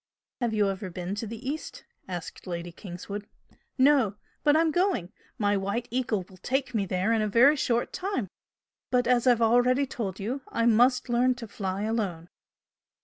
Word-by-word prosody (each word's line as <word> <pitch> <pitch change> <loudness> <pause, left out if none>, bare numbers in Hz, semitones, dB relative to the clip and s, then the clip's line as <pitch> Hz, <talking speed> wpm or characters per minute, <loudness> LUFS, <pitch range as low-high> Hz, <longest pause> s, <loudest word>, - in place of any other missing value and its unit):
"Have 235 -3 0
you 210 -1 +3
ever 190 0 -5
been 180 +2 -4
to 210 +2 -4
the 230 +4 -7
East?" 305 +3 -5 0.2
asked 180 0 -7
Lady 175 -1 -4
Kingswood. 200 +3 -7 0.5
"No 260 -6 +4 0.3
but 295 0 +5
I'm 325 0 +3
going! 350 - +1 0.3
My 205 -3 +2
'White 200 +5 -2
Eagle' 240 -6 -1
will 185 - -16
take 265 +5 -1
me 200 -4 0
there 185 +5 +1
in 225 - +2
a 215 - +1
very 245 +8 +6
short 240 -4 0
time! 375 - -2 0.6
But, 250 -1 +2
as 245 +1 +3
I've 240 -2 +5
already 245 +4 +4
told 205 -7 -4
you, 240 +8 -3
I 230 - 0
must 245 +3 +4
learn 245 +1 +2
to 240 -3 -8
fly 195 -1 -3
alone." 200 -7 -2
230 Hz, 175 wpm, -27 LUFS, 195-255 Hz, 0.6 s, very